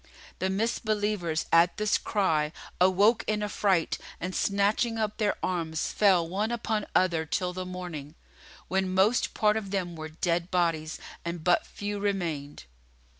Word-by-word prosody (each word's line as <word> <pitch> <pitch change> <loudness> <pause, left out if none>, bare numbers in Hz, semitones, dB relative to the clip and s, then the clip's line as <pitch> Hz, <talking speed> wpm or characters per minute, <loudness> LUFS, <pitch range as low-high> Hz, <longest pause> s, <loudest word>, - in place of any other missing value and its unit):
The 190 - 0
Misbelievers 205 -5 0
at 170 +1 +5
this 215 0 +2
cry 160 -7 +1 0.3
awoke 195 +5 +4
in 210 -1 0
affright 195 -4 +1 0.2
and 180 +2 -4
snatching 205 +5 +1
up 215 -1 -1
their 210 -2 +1
arms, 165 -3 -1
fell 185 -5 +4
one 200 +5 -1
upon 220 -2 -1
other 170 -3 +3
till 180 +3 -2
the 185 0 -5
morning, 170 -5 -7 0.5
when 190 0 0
most 205 +6 +3
part 210 0 +3
of 205 -3 -4
them 185 -3 -2
were 155 0 -6
dead 170 +2 -1
bodies 165 -3 0 0.3
and 170 -1 -4
but 175 0 +3
few 205 0 -4
remained. 170 -8 -2
185 Hz, 145 wpm, -28 LUFS, 170-205 Hz, 0.5 s, at